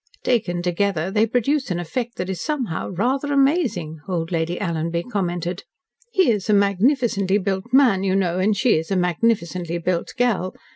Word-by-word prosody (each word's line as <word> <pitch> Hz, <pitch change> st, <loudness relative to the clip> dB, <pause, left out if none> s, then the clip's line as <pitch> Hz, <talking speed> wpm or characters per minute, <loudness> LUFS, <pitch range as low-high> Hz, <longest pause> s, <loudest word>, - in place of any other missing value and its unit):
"Taken 175 Hz, -8 st, 0 dB
together 180 Hz, -1 st, 0 dB
they 215 Hz, +2 st, +2 dB
produce 260 Hz, +4 st, 0 dB
an 175 Hz, -1 st, -1 dB
effect 235 Hz, +8 st, -4 dB
that 180 Hz, -, -4 dB
is 190 Hz, -3 st, -4 dB
somehow 260 Hz, -, -2 dB
rather 260 Hz, +10 st, -1 dB
amazing," 270 Hz, -, +1 dB
old 170 Hz, -3 st, -2 dB
Lady 170 Hz, +1 st, -1 dB
Alanby 170 Hz, -2 st, -2 dB
commented. 175 Hz, -3 st, -2 dB, 0.5 s
"He 375 Hz, -, +3 dB
is 210 Hz, -2 st, -2 dB
a -, -, +5 dB
magnificently 200 Hz, 0 st, +2 dB
built 195 Hz, -1 st, -2 dB
man, 250 Hz, -8 st, +4 dB
you 190 Hz, -1 st, +1 dB
know, 185 Hz, -2 st, +1 dB
and 200 Hz, +2 st, +2 dB
she 245 Hz, +1 st, +3 dB
is 160 Hz, -, -7 dB
a 195 Hz, -, 0 dB
magnificently 180 Hz, -2 st, 0 dB
built 170 Hz, 0 st, -2 dB
girl. 220 Hz, -7 st, 0 dB
195 Hz, 165 wpm, -22 LUFS, 175-235 Hz, 0.5 s, a